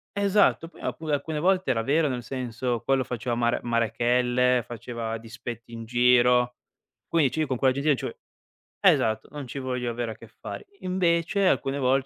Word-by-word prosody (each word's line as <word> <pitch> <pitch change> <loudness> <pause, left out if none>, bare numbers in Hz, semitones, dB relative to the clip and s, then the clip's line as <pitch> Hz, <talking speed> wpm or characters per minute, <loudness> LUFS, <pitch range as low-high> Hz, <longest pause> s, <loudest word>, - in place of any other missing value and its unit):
Esatto, 200 -4 +3
poi 170 - -16
alcu 160 - -4
alcune 150 +1 -1
volte 185 -1 +2
era 115 -3 +1
vero, 150 +5 +2
nel 125 -3 -3
senso, 125 -2 -3
quello 135 +1 +2
faceva 120 -1 -3
mare 120 0 +1
marachelle, 120 +1 +2
faceva 115 -1 -5
dispetti 115 +1 -8
in 115 0 -7
giro. 125 +1 +4 0.5
Quindi 155 -6 +2
cioè, 160 - -1
io 155 - 0
con 130 -1 -1
quella 130 +1 +3
gen 140 - -3
lì - - -2
non 145 - +4
ci - - -4
vo - - -12 0.7
esatto, 110 0 +3
non 145 -1 -6
ci 135 - -6
voglio 125 -2 -2
avere 115 -1 -3
a - - -8
che 115 - -14
fare. 100 -2 -9
Invece 185 +1 +1
alcune 135 -5 +1
vol 130 -2 +2
125 Hz, 190 wpm, -26 LUFS, 120-145 Hz, 0.7 s, giro